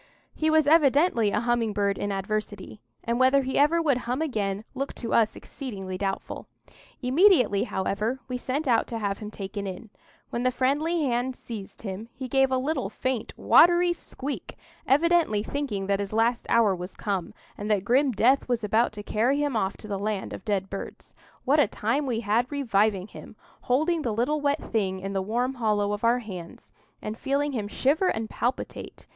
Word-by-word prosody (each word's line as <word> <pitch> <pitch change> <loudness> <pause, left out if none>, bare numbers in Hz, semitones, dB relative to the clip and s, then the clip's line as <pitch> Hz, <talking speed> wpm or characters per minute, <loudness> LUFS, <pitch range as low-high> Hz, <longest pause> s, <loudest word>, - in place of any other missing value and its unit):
He 315 - 0
was 315 -1 +4
evidently 290 - +4
a 210 +2 0
humming 235 -2 0
bird 200 -1 0
in 205 - -2
adversity, 205 0 -4 0.2
and 235 +1 -1
whether 265 +2 +4
he 260 +1 -1
ever 300 +4 +4
would 295 -6 +2
hum 250 +3 0
again 210 -10 -2
looked 275 +1 -4
to 230 - -4
us 220 -2 +3
exceedingly 195 -9 -7
doubtful. 195 0 -4 0.6
Immediately, 255 - +4
however, 210 +6 -2
we 255 - -4
sent 270 +4 -2
out 235 -3 +3
to 230 - -4
have 200 -3 -2
him 210 - -6
taken 200 -1 -5
in. 200 +3 -8 0.4
When 235 - -2
the 255 - +3
friendly 295 +6 0
hand 250 -1 0
seized 220 -5 -9
him, 205 +2 -6
he 260 -1 -5
gave 270 +1 +3
a 260 - +2
little, 265 -5 -1
faint, 250 +1 -3
watery 350 +1 +5
squeak, 285 -4 -6 0.3
evidently 310 -7 +3
thinking 235 -8 -3
that 200 0 0
his 200 -1 -3
last 230 +2 +1
hour 225 -4 +4
was 180 +1 -8
come, 195 -4 -3 0.2
and 205 +1 -5
that 205 -3 +2
grim 265 +5 +3
death 250 +5 +3
was 240 -2 0
about 220 +3 +2
to 205 -1 -7
carry 235 +7 +1
him 285 -4 -1
off 190 -3 -1
to - - -11
the 200 -2 -3
land 205 -1 -3
of - - -8
dead 195 -2 -1
birds. 195 0 -8 0.3
What 285 +3 +4
a 290 - +5
time 240 +9 -1
we 230 -3 -1
had 235 +4 +1
reviving 210 -8 +1
him,—holding 315 +6 -2
the 235 -6 -1
little 290 +7 0
wet 285 +1 0
thing 190 -4 0
in 195 +1 -5
the 195 - 0
warm 240 +6 -1
hollow 210 -4 0
of 205 - -5
our 235 +1 +4
hands, 180 -5 -9 0.3
and 215 - -4
feeling 285 +1 0
him 220 -6 -3
shiver 290 - +1
and 225 -7 -1
palpitate! 245 +3 -4
235 Hz, 185 wpm, -26 LUFS, 205-275 Hz, 0.6 s, watery